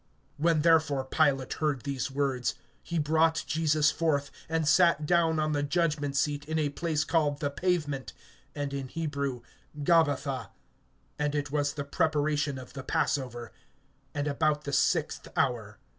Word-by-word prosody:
(13)When 165 -2 +3
therefore 155 -5 +3
Pilate 135 -2 +1
heard 145 -5 0
these 140 -2 -2
words, 135 -2 -1 0.3
he 170 - -4
brought 160 +1 +2
Jesus 155 -1 +2
forth, 145 -4 0 0.2
and 160 -1 0
sat 165 0 +4
down 165 -1 +3
on 155 0 +1
the 145 -1 0
judgment 145 -2 0
seat 145 +1 0
in 160 +1 -2
a 150 -2 +1
place 155 +1 -1
called 155 -3 +1
the 145 -1 -1
Pavement, 145 -4 -1 0.4
and 145 -1 -3
in 135 -1 -3
Hebrew, 140 -4 -3 0.4
Gabbatha. 140 - +2 0.7
(14)And 150 0 0
it 145 -1 -2
was 145 -1 0
the 145 - -3
preparation 150 -1 0
of 130 -1 -10
the 135 - -6
passover, 125 -4 -2 0.6
and 145 0 -1
about 150 +1 +1
the 140 - -5
sixth - - +1
hour. 115 -6 0
145 Hz, 150 wpm, -29 LUFS, 140-160 Hz, 0.7 s, sat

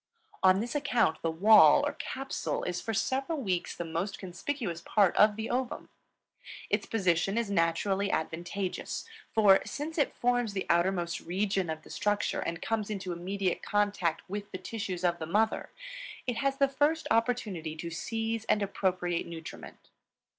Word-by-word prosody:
On 190 +1 +5
this 235 +1 -4
account 245 - +1
the 165 - 0
wall, 200 +7 +7
or - - -1
capsule, 270 +1 -3
is 180 0 -2
for 225 - -3
several 265 +8 -1
weeks 185 -8 -2
the 170 - -4
most 170 +5 -3
conspicuous 185 - -4
part 200 -4 +3
of 210 0 +5
the 220 +1 -4
ovum. 250 +1 -2 0.8
Its - - +1
position 195 -1 +1
is 230 -4 0
naturally 190 +3 +1
advantageous, 175 +4 -3 0.3
for, 205 -3 +6
since 310 +3 -4
it 290 - +1
forms 245 -3 +1
the 190 - -2
outermost 170 0 +1
region 190 0 -1
of 155 0 -4
the - - -13
structure 205 0 0
and 170 0 -3
comes 220 -2 -1
into 190 -4 -3
immediate 185 +2 -2
contact 200 -5 0
with 205 +2 -5
the - - -4
tissues 190 -4 -5
of 175 -1 +1
the 160 - -4
mother, 215 +6 +1 0.6
it 245 -2 -2
has 275 +2 0
the 275 -1 +4
first 295 +4 +1
opportunity 220 -9 0
to 170 +1 -6
seize 225 +5 -2
and 210 - +2
appropriate 180 -3 -1
nutriment. 165 -1 -10
200 Hz, 160 wpm, -30 LUFS, 175-225 Hz, 0.8 s, wall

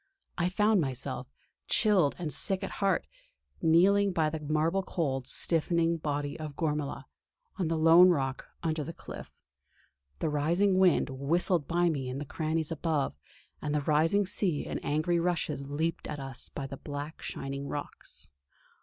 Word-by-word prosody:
I 175 0 +1
found 210 +1 +3
myself, 130 -2 -3 0.4
chilled 195 -10 +3
and 165 -4 -3
sick 195 -1 +1
at 195 - -4
heart, 195 -3 +2 0.6
kneeling 195 +5 +4
by 155 -3 +1
the 160 - -3
marble 155 +5 +1
cold, 135 -9 -2
stiffening 170 +1 +2
body 145 -1 -3
of 155 -2 -6
Gormala, 150 -3 -2 0.5
on 185 -4 0
the 165 0 0
lone 165 +3 +7
rock 135 -6 -1 0.2
under 160 -2 -1
the 165 - -6
cliff. - - -9 0.9
The - - -1
rising 170 +6 +2
wind 180 -6 +4
whistled 150 +4 +2
by 175 +1 +2
me 135 -5 -2
in 130 - -4
the 145 - -4
crannies 160 +2 -2
above, 155 -3 -1 0.5
and 150 0 -2
the 150 - +1
rising 160 +7 +3
sea 185 -4 0
in - - -3
angry 160 +4 0
rushes 170 -5 -1
leaped 160 +3 -2
at 150 - -5
us 135 -2 -3
by 140 - -5
the 135 0 -7
black 145 +3 -6
shining 140 +1 -5
rocks. 145 - -5
160 Hz, 155 wpm, -30 LUFS, 145-175 Hz, 0.9 s, lone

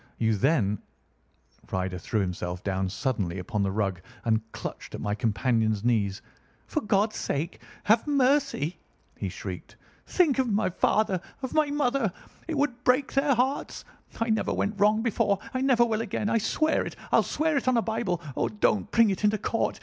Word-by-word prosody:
You 110 -1 +2
then—" 105 - +2 0.9
Ryder 95 -1 -2
threw 110 +3 -1
himself 90 -1 -3
down 95 -1 -1
suddenly 100 - -2
upon 105 +3 -2
the 100 - +1
rug 95 -4 -1 0.2
and 110 -1 +2
clutched - - -7
at - - -6
my 105 - -1
companion's 110 -1 +1
knees. 105 -5 +1 0.4
"For 310 - -2
God's 210 0 +1
sake, 155 +5 -3 0.2
have 225 +6 +3
mercy!" 275 - +2 0.4
he - - -3
shrieked. - - -7 0.3
"Think 310 -8 +3
of 255 -3 +1
my 205 -2 +1
father! 190 0 +1 0.2
Of 260 - -3
my 310 -1 +3
mother! 275 -6 +1 0.4
It 320 -3 -2
would 250 -4 0
break 255 +2 +2
their 275 0 +3
hearts. 260 +4 -1 0.3
I 230 0 +1
never 220 - +1
went 205 0 -1
wrong 210 +2 +4
before! 205 -3 +1 0.2
I 255 - -1
never 255 -3 +4
will 225 -1 0
again. 210 -1 -2
I 230 - +3
swear 310 +8 +1
it. - - -6 0.2
I'll - - +6
swear 315 0 0
it 275 - -1
on 255 -2 +4
a 230 - +2
Bible. 220 -7 -2
Oh, - - 0
don't 210 0 +1
bring 230 -2 +4
it 190 - -4
into 210 +1 +3
court! 230 +2 -1
210 Hz, 180 wpm, -27 LUFS, -, 0.9 s, I'll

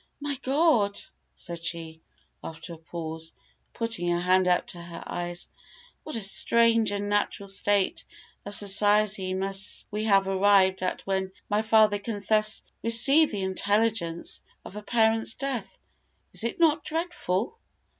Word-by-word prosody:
"My 290 -1 -3
God!" 265 -8 +2 0.4
said 170 -1 -7
she, 165 -1 -5 0.4
after 165 +1 -8
a 165 - -12
pause, 160 -1 -6 0.4
putting 230 -6 -1
her 175 0 +1
hand 185 +1 +3
up 180 -1 +2
to 175 - -8
her 170 0 -9
eyes, 175 0 -5 0.5
"what 310 - -7
a 225 - -3
strange, 230 +2 +3
unnatural 205 0 -1
state 200 0 +1 0.4
of 205 0 -7
society 205 -1 +2
must 195 0 -2
we 210 +1 -2
have 195 -2 +3
arrived 190 -1 +3
at 185 - -3
when 190 -1 -1 0.2
my 210 +1 +2
father 220 -2 +4
can 205 0 -5
thus 215 0 +3 0.2
receive 275 +7 +5
the 200 -2 -3
intelligence 200 -2 -1 0.2
of - - -10
a 210 - -6
parent's 225 0 +1
death. 270 -4 -4 0.6
Is - - 0
it 235 - -3
not 320 -2 +3
dreadful?" 325 - -3
205 Hz, 140 wpm, -26 LUFS, 185-225 Hz, 0.6 s, receive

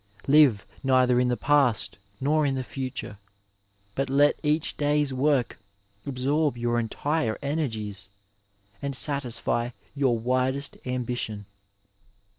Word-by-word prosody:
Live 135 -8 +5 0.2
neither 130 -2 +3
in 125 - +2
the 125 -1 0
past 140 -9 +2 0.2
nor 155 +3 +2
in 140 -2 +1
the 130 - -2
future, 130 -6 -6 0.7
but 135 +3 -2
let 145 +2 +3
each 150 0 0
day's 145 -1 +1
work 135 -2 +1 0.5
absorb 140 +1 0
your 120 0 0
entire 120 +1 -1
energies, 110 - -2 0.7
and 140 -1 -2
satisfy 125 -3 0 0.3
your 135 -4 +2
widest 130 +4 0
ambition. 120 -4 -3
130 Hz, 110 wpm, -26 LUFS, 120-145 Hz, 0.7 s, Live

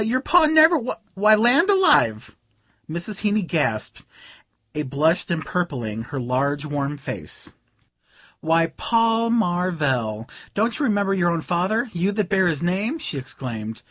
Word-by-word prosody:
Your 235 +4 0
Pa 320 +4 +4
never? 315 +1 +6 0.3
Why, 210 +3 +5
land 245 - +4
alive!" 130 - +3 0.5
Mrs. 170 +5 -3
Heeny 210 0 +1
gasped, 145 -11 -2 0.7
a 150 - -2
blush 150 +5 0
empurpling 140 -10 -3
her 140 +2 -5
large 140 +4 -1
warm 145 -1 -3
face. 100 - -7 0.9
"Why, 165 +1 +1
Paul 230 0 +1
Marvell, 155 - -1 0.3
don't 225 +6 0
you 290 - +1
remember 205 -4 +1
your 180 -3 +1
own 170 -1 -1
father, 190 +9 -1
you 180 +3 0
that 205 -3 -2
bear 190 -3 +2
his 165 -2 -1
name?" 200 - -1
she 295 - -5
exclaimed. 115 -4 -7
175 Hz, 140 wpm, -22 LUFS, 140-220 Hz, 0.9 s, never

